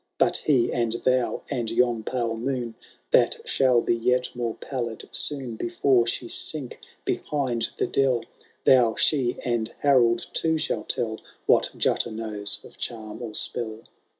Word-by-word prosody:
But - - +3
he, 130 -6 +2
and 115 -2 +1
thou, 130 -1 +1
and 120 -5 -2
yon 120 0 +2
pale 115 0 -1
moon, 120 0 -2 0.4
(That - - +4
shall 125 -3 +4
be 120 - +1
yet 125 +2 +1
more 120 -2 -2
pallid 120 -4 -5
soon. 130 -6 -3
Before 135 -8 +2
she 120 +1 -3
sink 140 +1 -4 0.3
behind 125 -6 -1
the - - +1
dell,) 130 -4 +1 0.4
Thou, 120 -4 +6
she, 130 -5 +2
and 120 -3 0
Harold 120 -5 +4
too, 160 -1 +1
shall - - -2
tell 110 -1 -2 0.3
What - - +4
Jutta - - +1
knows 110 -2 -3
of - - -15
charm 110 -1 -4
or 110 -3 -6
spell." 110 -2 -3
120 Hz, 150 wpm, -26 LUFS, 115-130 Hz, 0.4 s, Thou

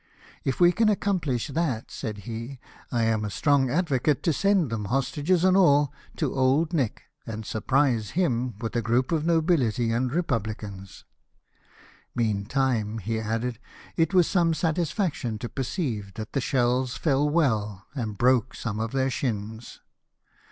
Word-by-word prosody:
" - - -22
If 130 - -1
we 175 0 +7
can 225 +3 +3
accomplish 170 - 0
that," 140 -6 -2
said 105 -2 -5
he, 115 +4 -6 0.2
" - - -21
I 120 -2 +1
am 110 -1 +1
a 105 - -2
strong 140 +4 +2
advocate 145 -2 +1
to 165 - +2
send 195 - +2
them, 110 -2 -2
hostages 145 - +1
and 185 0 +5
all, 145 -7 +4 0.2
to - - -1
Old 140 +6 +2
Nick, 135 -9 -1 0.2
and 110 -1 -5
surprise 120 0 +1
him 125 - +1
with 115 0 -4
a 120 - +2
group 120 +4 +1
of 160 -1 0
nobility 155 - +2
and 120 +2 0
republicans. 110 - -3 1.1
Meantime," 115 0 0
he 110 +2 -2
added, 115 +2 -2 0.2
" - - -21
it 165 +1 +2
was 180 -3 +4
some 170 -3 +2
satisfaction 160 - -1
to 120 - -5
perceive 120 - -3
that 110 0 -7
the 135 - 0
shells 125 0 +1
fell 145 -1 +2
well 110 - 0
and 110 -7 -4
broke 125 +1 +2
some 110 -2 -4
of 115 +2 -3
their 135 0 +1
shins." 110 -2 -4
130 Hz, 160 wpm, -26 LUFS, 110-155 Hz, 1.1 s, we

